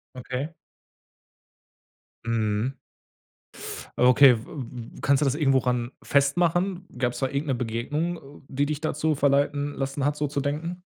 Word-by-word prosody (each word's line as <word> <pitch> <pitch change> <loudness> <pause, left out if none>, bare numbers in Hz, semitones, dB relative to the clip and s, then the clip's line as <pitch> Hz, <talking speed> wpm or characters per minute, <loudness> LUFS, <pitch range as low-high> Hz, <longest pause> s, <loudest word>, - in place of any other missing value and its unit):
Okay. 130 +3 -4 1.8
Mhm. 115 +2 0 1.2
Okay. 125 +1 +7
W 110 - -10 0.5
w - - -11
kannst 140 0 +3
du - - +3
das 135 - +2
irgendwo 140 -3 +3
ran 125 -2 0
festmachen? 175 +6 +2
Gab's 125 -1 0
da 135 - +1
irgend 140 +3 -3
'ne 135 - +1
Begegnung, 140 +6 -3
die 140 +1 0
dich 150 -1 -2
dazu 155 0 0
verleiten 145 +1 +1
lassen 135 0 -2
hat, 145 0 +1
so 150 0 -1
zu 145 0 -2
denken? 155 +6 -3
140 Hz, 135 wpm, -26 LUFS, 125-150 Hz, 1.8 s, Okay